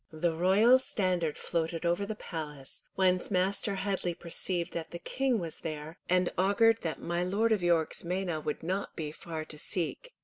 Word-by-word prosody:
The 160 +1 0
royal 200 +9 +5
standard 180 - 0
floated 165 0 -2
over 175 +4 +1
the 215 - -3
palace, 150 -8 -6
whence 185 -1 +3
Master 195 +3 +1
Headley 190 -3 -1
perceived 175 +1 -1
that 165 -1 -4
the 170 - -6
King 260 +6 0
was 170 -5 -4
there, 155 +1 -6
and 180 0 +4
augured 225 +4 +4
that 165 -2 -3
my 170 +1 -1
Lord 205 +5 +1
of 215 -4 +3
York's 170 -2 +2
meiné 175 -3 -2
would 150 0 -3
not 190 +4 -2
be 150 -2 -3
far 160 0 -6
to 150 - -8
seek. 190 - -2
175 Hz, 175 wpm, -31 LUFS, 165-195 Hz, -, royal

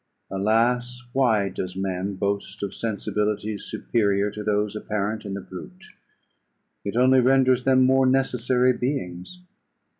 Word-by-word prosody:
Alas! 120 +5 +1
why 115 -7 +2
does 90 -1 -5
man 95 +1 -3
boast 100 +1 -3
of 100 - -3
sensibilities 105 -1 -2
superior 100 -2 0
to 105 - -6
those 105 0 0
apparent 105 0 -3
in 100 -1 -4
the 100 - -5
brute; 180 - -10 1.0
it 100 - -4
only 130 +1 +5
renders 130 0 +3
them 130 -1 +5
more 130 0 +4
necessary 130 -1 +2
beings. 125 - -4
110 Hz, 125 wpm, -24 LUFS, 100-130 Hz, 1.0 s, only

